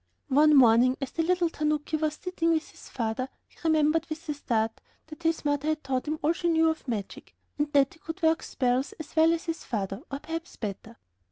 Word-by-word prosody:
One 300 +3 +5
morning, 250 0 +6
as 270 -3 -4
the 330 - -1
little 350 +1 +2
tanuki 300 0 -1
was 310 -1 0
sitting 335 -1 -1
with 315 -1 -1
his - - -14
father, 235 +2 -2 0.2
he - - -25
remembered, 315 0 +2
with 315 +1 -6
a - - +1
start, 225 -6 -1 0.2
that 315 +1 -12
his 325 -2 0
mother 290 0 0
had 310 0 0
taught 265 +1 -2
him 310 +1 -1
all 315 +3 +3
she 345 0 -1
knew 325 -1 +4
of 315 - -8
magic, 215 -5 -5 0.2
and 295 0 0
that 275 -2 +4
he 325 - -20
could 325 +3 -7
work 320 0 +3
spells 255 +1 0
as 315 0 -10
well 320 +1 +5
as 335 0 -1
his 330 -1 -4
father, 200 -2 -3
or 275 - -3
perhaps 325 +3 -6
better. 215 +2 -6
300 Hz, 215 wpm, -28 LUFS, 260-325 Hz, 0.2 s, morning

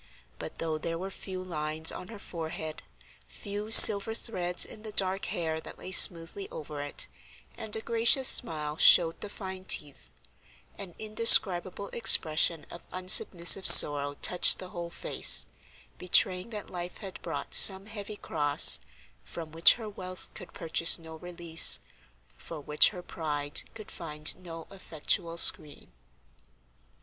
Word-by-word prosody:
But - - -11
though 160 -1 -7
there 165 +1 -7
were 190 +3 -10
few 185 -1 -11
lines 155 -2 -2
on 180 - -12
her 225 - -13
forehead, 160 -4 -10 0.5
few 205 - -10
silver 220 0 +7
threads 180 -7 -2
in 215 - -15
the 215 -1 -11
dark 190 -1 -4
hair 160 -2 -6
that - - -14
lay 185 - -11
smoothly 175 +1 +2
over 150 -1 -11
it, 145 0 -7 0.5
and 215 - -10
a 220 - -7
gracious 235 +4 +1
smile 150 -2 +2
showed 165 -1 +3
the 210 - -9
fine 190 -2 -10
teeth, 145 - -4 0.7
an 190 -4 -12
indescribable 200 -3 +2
expression 160 -7 0
of 170 - -12
unsubmissive 185 0 +3
sorrow 145 -1 +7
touched 180 - +3
the 185 - -12
whole 170 -2 -10
face, - - -1 0.5
betraying 180 +2 -1
that 210 -3 -11
life 175 0 -9
had 195 -3 -12
brought - - -9
some 190 0 +5
heavy 210 -1 -10
cross, 145 - +3 0.4
from 160 - -12
which 165 +1 +3
her 225 -3 -12
wealth 185 -3 -11
could - - -13
purchase 165 0 +1
no 160 -1 -15
release, 170 -1 -1 0.6
for 160 - -12
which 150 +1 +2
her 180 -4 -13
pride 145 -4 -6
could 215 -1 -13
find 150 -2 -4
no 165 -2 -12
effectual 170 -2 -5
screen. 150 - -2
175 Hz, 140 wpm, -25 LUFS, 160-195 Hz, 0.7 s, silver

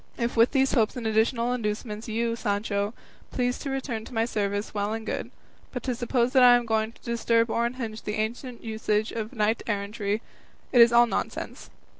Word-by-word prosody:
If 235 0 -1
with 230 +1 +5
these 270 -1 +2
hopes 225 -5 +2
and 240 - -5
additional 230 +2 +2
inducements 215 -1 -3
you, 230 +1 -1
Sancho, 205 -1 -1 0.3
please 250 0 -1
to 280 - -4
return 265 -4 -3
to - - -11
my 225 0 +2
service, 205 -2 -2
well 205 0 -1
and 225 0 -5
good; - - -3 0.4
but 250 -3 -5
to 255 - -1
suppose 240 +1 0
that 260 - +6
I 245 -1 +9
am 240 -1 +1
going 220 0 0
to - - -23
disturb 230 -1 +1
or 235 0 +1
unhinge 230 -3 -5
the 210 - -3
ancient 235 +3 -4
usage 220 -1 -1
of 220 -1 -4
knight 220 -2 0
errantry, 205 0 -2 0.5
is 235 -2 +7
all 240 0 +7
nonsense. 235 - -4
230 Hz, 190 wpm, -26 LUFS, 215-240 Hz, 0.5 s, I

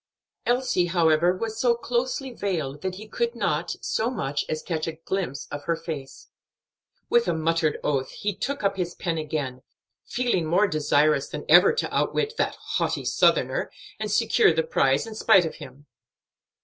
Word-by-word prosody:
Elsie, 245 -8 +2
however, 170 +1 +3
was 220 +1 -4
so 240 -1 +3
closely 250 +3 -2
veiled 155 - -3
that 185 -1 -3
he 215 +3 -10
could 470 - -2
not - - -1
so 225 - 0
much 145 - -2
as 155 0 -3
catch 160 -3 -2
a 165 - -3
glimpse 165 -2 -4
of 145 0 -6
her 170 - +1
face. 145 -5 -8 0.8
With 475 0 +3
a - - +1
muttered 160 -1 +1
oath, 135 -2 0
he 205 0 -3
took 275 +5 -4
up 200 0 +1
his 175 -2 -3
pen 165 -2 -2
again, 145 -5 -3 0.5
feeling 240 -10 0
more 180 +6 +4
desirous 150 -4 +2
than 150 0 -6
ever 175 +5 +7
to 470 - -2
outwit 445 +2 0
"that - - 0
haughty - - -2
Southerner," - - +2 0.3
and - - -3
secure 430 -2 +4
the 485 - +1
prize 475 - +2
in 225 - -8
spite 215 -4 +4
of 160 - -5
him. 135 +3 -12
175 Hz, 170 wpm, -25 LUFS, 155-230 Hz, 0.8 s, ever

